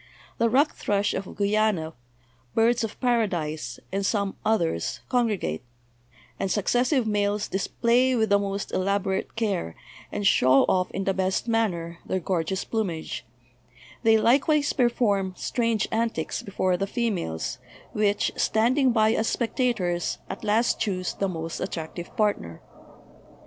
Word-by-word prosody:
The 230 0 +3
rock 280 +6 +3
thrush 205 0 0
of 190 0 -5
Guiana, 205 -5 +1 0.6
birds 230 +1 +3
of 220 - -5
paradise, 170 - -1
and 195 +1 -1
some 200 -1 0
oth 220 -2 +2
ers, 125 - -2
congregate; 215 - 0 0.8
and 195 - -1
successive 245 - +2
males 205 -1 0
display 240 +6 +2
with 220 -2 +1
the 200 - +5
most 200 0 -3
elaborate 195 0 -1
care, 200 - -1 0.4
and 205 -1 -3
show 130 -7 +5
off 180 -1 +1
in 195 - -3
the 195 - +1
best 190 +3 -1
manner, 175 -8 -1
their 190 - -1
gorgeous 185 +1 -1
plumage; 190 -8 -3 0.7
they 225 -1 +5
likewise 285 +6 +3
perform 210 -7 +1
strange 230 -3 0
antics 225 -7 -1
before 185 -2 0
the 195 +2 -2
females, 195 - -2 0.3
which, 205 -1 +1
standing 250 +5 +2
by 220 -2 +3
as 220 - 0
spectators, 225 -8 0
at - - -7
last 225 +3 +2
choose 185 -4 -1
the 195 - -1
most 165 -2 -5
attractive 170 -1 -6
partner. 200 - 0
205 Hz, 135 wpm, -26 LUFS, 185-230 Hz, 0.8 s, the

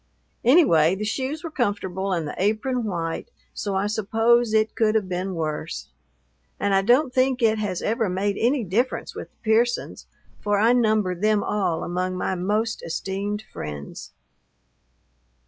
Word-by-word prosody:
Anyway 190 - +5
the 210 +2 -4
shoes 265 +7 -3
were 330 - -5
comfortable 195 - -1
and 165 -4 -1
the - - -5
apron 220 +5 0
white, 170 - -3 0.2
so 200 -2 -3
I 190 +1 +1
suppose 225 +2 +2
it 220 0 +2
could 220 -1 +2
have 210 -4 +1
been 185 +1 -3
worse; 155 0 -4 0.7
and 200 - +1
I 195 - +4
don't 250 +6 +3
think 255 -1 +2
it 220 -1 +3
has 195 -4 -2
ever 225 -1 0
made 195 +2 0
any 250 +2 +2
difference 220 +7 -1
with - - -8
the - - -41
Pearsons, 230 +2 0 0.3
for 205 -1 0
I 225 +4 +4
number 215 -6 +2
them 210 +3 +1
all 195 -6 -1
among 185 +1 -2
my 190 - -1
most 210 +5 -1
esteemed 195 +5 -3
friends. 75 -1 -7
210 Hz, 155 wpm, -24 LUFS, 185-230 Hz, 0.7 s, Anyway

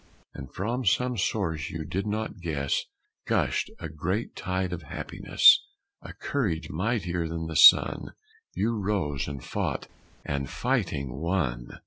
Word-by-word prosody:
And 65 -3 -9
from 120 +7 -2
some 125 +5 +2
source 90 -7 -1
you 80 -1 -5
did 95 +7 -3
not 110 -1 -3
guess 70 -5 -1 0.4
Gushed - - +1
a 85 - -6
great 90 +8 -3
tide 95 -1 -2
of 90 - -5
happiness 75 - +4 0.4
A - - -9
courage 100 - -2
mightier 90 -2 -1
than 80 0 -4
the 80 0 -5
sun - - +6 0.4
You 115 +2 0
rose 95 -9 -1
and 70 -3 -6
fought - - -3 0.4
and, 70 -2 -2
fighting, 70 0 -1
won! 75 -9 -1
85 Hz, 135 wpm, -27 LUFS, 75-100 Hz, 0.4 s, sun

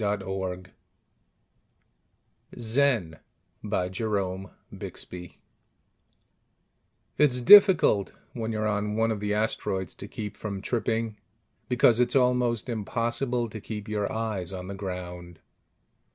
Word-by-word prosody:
_ - - -2
[Illustration: 95 -2 -3 1.8
Illustrated 120 - +1 0.4
by 90 - -1
ASHMAN] 95 -2 -5 1.9
It's 135 -4 +4
difficult, 175 - +7 0.2
when 115 -2 -3
you're 110 -1 -1
on 105 0 -1
one 115 +1 +2
of 110 - -2
the 105 0 -1
asteroids, 105 -3 -2
to 100 - -9
keep 105 -1 -6
from 100 -3 -5
tripping, 115 -2 -1 0.5
because 120 -2 +4
it's 125 +1 +2
almost 125 -3 +2
impossible 120 +2 -1
to 110 0 -8
keep 105 0 -6
your 105 -1 -2
eyes 110 -6 -3
on 90 -1 -6
the 100 - -6
ground. 90 -3 -7
105 Hz, 110 wpm, -27 LUFS, 95-120 Hz, 1.9 s, difficult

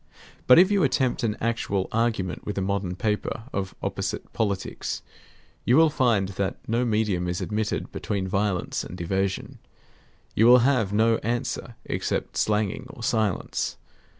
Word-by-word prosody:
But 125 - +9
if 185 +3 +7
you 200 -2 +3
attempt 130 -3 +1
an 110 -3 -1
actual 110 -4 -1
argument 110 -5 -1
with 105 - -5
a - - +1
modern 95 -2 -1
paper 105 +2 -2
of 95 -1 -3
opposite - - -3
politics, 100 -4 -2 0.6
you 125 - +4
will 160 -1 +6
find 115 -9 +2
that 100 0 -2
no 115 +2 +1
medium 105 -6 0
is 90 0 -2
admitted 105 0 -2
between 95 -2 -3
violence 100 -1 -1
and 90 - -8
evasion. 95 +2 -2 0.7
You 110 - +4
will 125 0 +7
have 125 -8 +2
no 110 +2 +3
answer 120 +1 -3
except - - -2
slanging 105 +3 0
or 120 - -10
silence. 110 -5 -1
110 Hz, 150 wpm, -25 LUFS, 95-120 Hz, 0.7 s, But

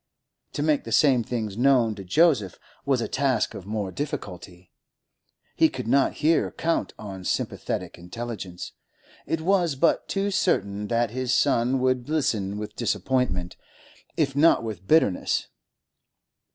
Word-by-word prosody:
To 145 - -2
make 150 -2 +2
the 115 - -8
same 130 -2 +4
things 110 -3 -4
known 125 -2 +3
to 100 -2 -9
Joseph 115 - +2 0.3
was 135 -3 +2
a - - -2
task 130 -4 0
of 95 - -9
more 105 -3 -3
difficulty. 90 - -6 0.8
He - - +4
could - - -6
not 135 +3 +3
here 165 +1 +3
count 165 0 -1
on 95 -3 -8
sympathetic 90 - -3
intelligence; 95 -1 -7 0.6
it 165 - -1
was 175 -3 +2
but 145 +5 +2
too 200 +1 -1
certain 100 - 0
that 115 -1 0
his 130 0 -2
son 130 -2 +2
would 130 0 0
listen 110 -10 0
with 105 0 -6
disappointment, 120 -7 -1 0.6
if 140 -5 +1
not 150 -3 +4
with 100 -5 -6
bitterness. 155 - +2
120 Hz, 140 wpm, -25 LUFS, 100-140 Hz, 0.8 s, same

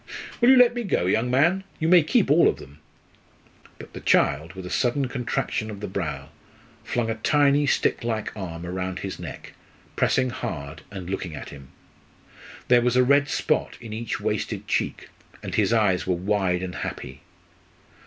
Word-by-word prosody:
Will 240 - +6
you 265 - +8
let 245 -1 +6
me 240 - -3
go, 185 - 0
young 110 +6 +1
man? 170 +10 +3 0.2
You 160 - 0
may 175 0 +7
keep 185 - +2
all 165 +3 +6
of - - +1
them." 70 +2 -14 1.0
But - - -12
the - - -7
child, 80 +5 +2
with 95 -1 -8
a - - -6
sudden 130 +2 +1
contraction 125 -3 -2
of 105 -2 -7
the 105 - -5
brow, - - -4 0.5
flung 115 -2 -1
a 110 0 -6
tiny 145 0 +3
stick 140 - +1
like 110 -2 -3
arm 85 -4 -6
round 90 +1 -4
his 95 - -6
neck, - - -9 0.4
pressing 130 -1 +1
hard, 75 -6 -6
and 95 -3 -8
looking 90 -4 -4
at - - -8
him. 70 -2 -12 1.0
There 125 -1 +5
was 125 0 +1
a 125 - +5
red 140 +2 +4
spot - - -1
in 115 -3 -8
each 115 +1 -4
wasted - - -3
cheek, - - -2 0.3
and - - -6
his - - +2
eyes 95 -5 +2
were 90 - +2
wide 95 -1 0
and 90 -1 -5
happy. 65 - -6
110 Hz, 180 wpm, -24 LUFS, 90-140 Hz, 1.0 s, you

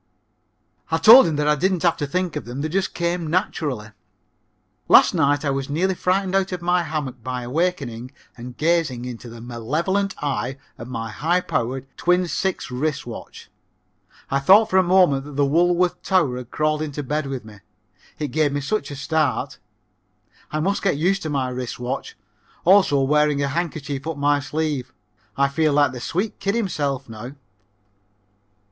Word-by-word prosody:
I 160 - +1
told 225 +9 +9
him 160 - -1
that 150 0 0
I 150 - +5
didn't 185 +4 0
have 170 -2 +3
to 145 - -2
think 180 +2 -2
of - - -4
them, 125 +4 -6
they 155 - -2
just 190 +3 -1
came 170 -1 -1
naturally. 145 -9 -2 1.0
Last - - +7
night 145 -2 +2
I 140 - +1
was 135 0 -3
nearly 180 +6 +1
frightened 185 +1 0
out 195 0 +1
of 180 - -3
my 175 +1 +2
hammock 145 -8 -4
by 125 0 -4
awakening 130 -4 -2 0.3
and 125 0 -10
gazing 155 -7 0
into 120 -1 -8
the 115 0 -10
malevolent 155 - -2
eye 135 -2 -3 0.2
of 120 - -7
my 115 -3 -5
high 170 +10 +1
powered, 130 -5 -2
twin 180 +1 +2
six 190 -5 -2
wrist 140 +3 -2
watch. 120 -2 -10 0.8
I 140 - +2
thought 200 +10 +5
for 190 - +3
a - - +7
moment 175 -7 +3
that 145 - -9
the 140 0 +3
Woolworth 175 +4 +2
tower 165 -10 +1
had 125 -1 -8
crawled 155 +1 0
into 145 -1 -4
bed 150 +2 -2
with 130 -4 -5
me. 105 -1 -12 0.6
It 150 - -3
gave 150 +2 +1
me 145 - -1
such 215 +10 -2
a 145 - -6
start. 150 +2 -1 0.9
I 155 - -2
must 195 +5 0
get 185 -6 +1
used 190 +5 +1
to 155 - -4
my 135 -3 -1
wrist 125 -1 -5
watch 125 +1 -5 0.5
also 185 -7 +5
wearing 150 +1 +2
a 140 - 0
handkerchief 145 -3 -3
up 160 -3 -3
my 145 0 +2
sleeve. 150 -2 -3 0.4
I 140 0 +3
feel 155 +1 +1
like 145 -2 +3
the 125 -2 -8
sweet 190 - -3
kid 200 +2 -1
himself 145 - -2
now. 115 +3 -8
150 Hz, 180 wpm, -22 LUFS, 135-175 Hz, 1.0 s, told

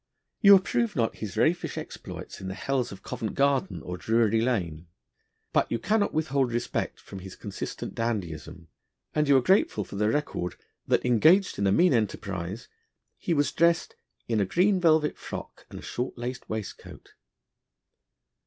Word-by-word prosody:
You 200 -2 +9
approve 230 +3 +1
not 115 -4 0
his 105 -3 -6
raffish 170 +2 +1
exploits - - -8
in 95 - -6
the 95 - -4
hells 125 +3 -1
of 100 - -10
Covent 110 - -4
Garden 140 +5 +1
or 90 0 -5
Drury 115 +1 +2
Lane. 90 -10 -1 0.7
But - - +2
you 115 - +1
cannot 210 - +1
withhold 140 -5 0
respect 120 +1 -2
from 95 - -10
his 95 0 -9
consistent - - -6
dandyism, 90 -7 -4 0.5
and 150 -1 +1
you 140 -1 +6
are 130 - +2
grateful 155 - +3
for 100 - -8
the 105 +1 +2
record 110 - -2 0.3
that, - - +2
engaged 155 - +4
in 100 - +2
a - - +3
mean 175 - +4
enterprise, 100 -3 -2 0.5
he 170 - 0
was 145 -1 +2
dressed 170 0 +2 0.3
'in 115 -2 +1
a 100 - +2
green 185 - +2
velvet 160 -3 +3
frock - - -8
and - - -9
a - - -9
short 125 +1 -4
lac'd 125 +1 -5
waistcoat.' 110 -1 -7
120 Hz, 165 wpm, -27 LUFS, 100-155 Hz, 0.7 s, You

